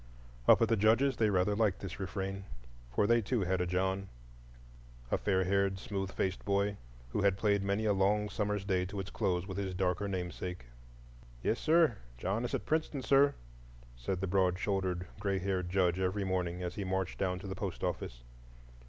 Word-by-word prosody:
Up - - +8
at - - +4
the 115 - +3
Judge's 115 +6 +3
they 110 -2 +3
rather 100 +1 +2
liked 105 -3 +2
this 95 -2 -6
refrain; 95 +1 -4 0.5
for 85 - +2
they 115 +2 +4
too 115 +2 0
had 95 0 +1
a 90 - 0
John—a - - -5
fair 95 -2 +2
haired, 100 +1 +1
smooth 95 -2 -4
faced 95 -1 -2
boy, 100 0 +1 0.3
who - - 0
had 100 -1 +3
played 100 -1 +2
many 100 +2 0
a 105 - +3
long 105 +2 +2
summer's 105 -2 -2
day 95 -2 +1
to 100 +2 -5
its 95 - -5
close 95 -4 0
with 95 0 -5
his 95 -2 -3
darker 95 +2 0
namesake. 90 -4 -4 0.8
"Yes, 115 - +1
sir! 160 -7 +4 0.2
John 95 - -1
is - - -1
at - - -4
Princeton, 155 -3 -1
sir," 140 +1 +5 0.6
said 75 +10 -3
the - - +1
broad 90 -1 +2
shouldered 95 -2 -1
gray 100 -1 0
haired 95 -2 -1
Judge 90 -1 +2
every 95 +2 0
morning 90 -2 -1
as 90 0 -3
he 100 - -4
marched 95 -1 -2
down 90 -1 0
to 95 - -9
the 95 - -3
post 95 -2 -4
office. - - -3
95 Hz, 190 wpm, -33 LUFS, 90-105 Hz, 0.8 s, Up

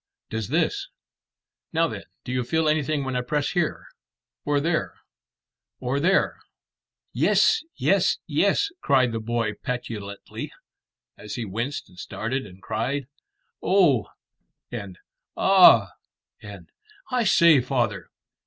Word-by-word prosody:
Does 110 -2 -3
this? - - 0 0.8
Now - - +3
then, - - -7 0.2
do - - -6
you 125 0 0
feel 160 +6 0
anything 150 -1 +1
when 130 -1 -3
I 125 - +1
press 145 +3 -1
here 175 -3 -1 0.6
or 145 0 +1
there 165 +2 -1 0.8
or 130 +2 -1
there?" 185 +6 +2 0.7
"Yes 445 - +3
yes - - +2
yes!" 405 0 +1
cried 130 -3 +3
the 115 - -3
boy 115 -1 -1
petulantly, 110 -6 -6 0.7
as 105 - -7
he 120 -3 -3
winced 120 +8 -4
and 90 - -17
started 125 +6 -4
and 95 0 -16
cried 125 +5 -2 0.5
"Oh!" 170 - +3 0.6
and 100 -6 -6 0.4
"Ah!" 175 - +7 0.5
and 100 -4 -11 0.4
"I 250 -1 +2
say, 170 - +6
father!" 120 -5 -1
125 Hz, 120 wpm, -24 LUFS, 110-150 Hz, 0.8 s, Ah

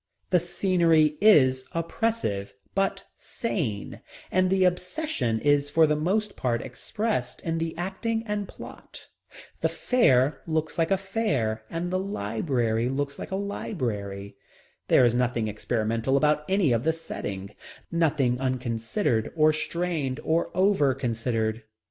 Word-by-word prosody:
The 180 - +5
scenery 170 -3 +3
is 130 -11 +5
oppressive, 165 - -2 0.2
but 195 0 0
sane, 140 - -4 0.3
and 185 0 +3
the 190 0 +3
obsession 180 - 0
is 145 0 +3
for 160 +2 +5
the 150 0 +2
most 200 +7 0
part 120 -2 -1
expressed 130 - -3
in 165 -1 -2
the 165 0 -3
acting 225 +6 -2
and 210 -2 -2
plot. - - -11 0.5
The - - +2
fair 140 - +2
looks 160 0 -1
like 165 - +2
a 195 - +3
fair 145 - -1
and 175 +2 -3
the 185 - +1
library 115 - -1
looks 140 +1 -3
like - - -6
a 190 - -2
library. 105 - -4 0.5
There 125 - +6
is 120 - +3
nothing 120 -2 0
experimental 115 +4 0
about 150 +1 +2
any 190 -7 +3
of 115 0 +1
the 160 - +2
setting, 100 -12 -6 0.4
nothing 150 -7 +1
unconsidered 120 - -1
or 155 -1 +5
strained 155 -4 -2
or 165 +2 +1
over 185 -9 +3
considered. 115 -3 -1
150 Hz, 135 wpm, -26 LUFS, 120-185 Hz, 0.5 s, There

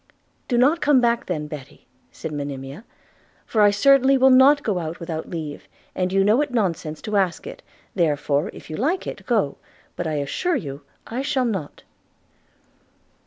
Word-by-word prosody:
'Do 245 - 0
not 285 +7 +3
come 290 -3 +4
back 235 -1 +1
then, 155 -5 -2
Betty,' 150 -3 -10 0.3
said 160 - -7
Monimia; 140 - -6 0.6
'for 220 - +1
I 205 - +7
certainly 270 +6 +4
will 265 0 +5
not 270 +3 +6
go 200 -5 0
out 165 0 -5
without 165 -1 -5
leave, 155 -4 -6 0.3
and 185 0 -1
you 195 0 +3
know 215 +7 +4
it 295 - -1
nonsense 170 -10 -2
to 210 -1 -1
ask 190 - 0
it 485 - -9 0.2
– - - -34
therefore, 150 -1 0
if - - -13
you 155 - -6
like 325 - 0
it, - - -7
go; 210 - +1 0.4
but - - -3
I 155 - -2
assure 150 - -1
you 140 -1 -5 0.2
I 240 +3 -4
shall 275 -2 0
not.' 190 -11 -4
195 Hz, 175 wpm, -22 LUFS, 155-260 Hz, 0.6 s, I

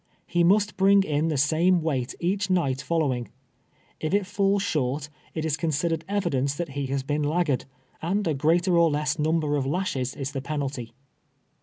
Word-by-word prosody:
He 175 0 +1
must 205 +4 +3
bring 195 +1 +5
in 155 -2 0
the 155 -3 0
same 165 +5 +3
weight 130 -6 -1
each 190 +3 0
night 140 -8 +1
follow 155 -3 +1
ing. 120 -1 -5 0.7
If 155 +5 0
it 205 -1 +1
falls 200 0 +1
short, 145 - -1 0.3
it 160 -1 -2
is 155 -2 +1
considered 165 +1 -1
evidence 145 -9 0
that 170 +1 -4
he 140 0 -3
has 135 0 -2
been 145 +2 -1
laggard, 150 -2 0 0.4
and 195 +5 0
a 160 - +2
greater 170 +6 +2
or 170 -1 +5
less 150 0 -1
number 155 -1 +1
of 135 -2 -1
lashes 140 -6 -1
is 135 0 -4
the 135 -2 -4
penalty. 135 -5 -4
155 Hz, 180 wpm, -26 LUFS, 140-175 Hz, 0.7 s, bring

